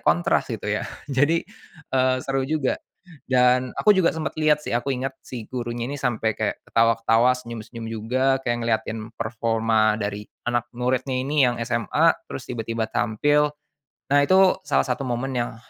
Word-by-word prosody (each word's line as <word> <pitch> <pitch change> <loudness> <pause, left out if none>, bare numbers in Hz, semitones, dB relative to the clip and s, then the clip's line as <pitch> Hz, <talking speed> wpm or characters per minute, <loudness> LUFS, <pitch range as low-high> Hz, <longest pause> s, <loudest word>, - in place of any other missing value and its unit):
kontras 85 +2 +2
gitu - - -5
ya. - - -1 0.2
Jadi, 145 +5 +2 0.5
eee, 130 -1 +3
seru 135 0 0
juga 155 -4 0 0.5
dan 125 0 +4
aku 210 -1 +5
juga 185 -3 +3
sempat 160 -1 -4
lihat 155 -1 +4
sih, - - -3
aku 120 +4 -1
ingat 130 +1 -3
si 120 -4 -8
gurunya 120 -1 -4
ini 140 - -4
sampai 110 -4 0
kaya - - -1
ketawa-ketawa, 115 +2 +3
senyum-senyum 115 -1 -8
juga, 130 +4 0
kayak 120 -1 0
ngelihatin 110 0 -1 0.2
performa 115 -1 +1
dari 105 0 -4 0.2
anak 120 0 0
muridnya 130 +2 -1
ini 135 +2 +2
yang 120 - +1
SMA, 115 -2 +1 0.2
terus 70 - -8
tiba-tiba 115 -1 -3
tampil. 145 +7 +1 0.6
Nah, 145 - +6
itu 190 0 +5
salah - - +3
satu 135 - -2
momen 125 +2 -2
yang, 120 -1 -3
120 Hz, 155 wpm, -24 LUFS, 115-135 Hz, 0.6 s, Nah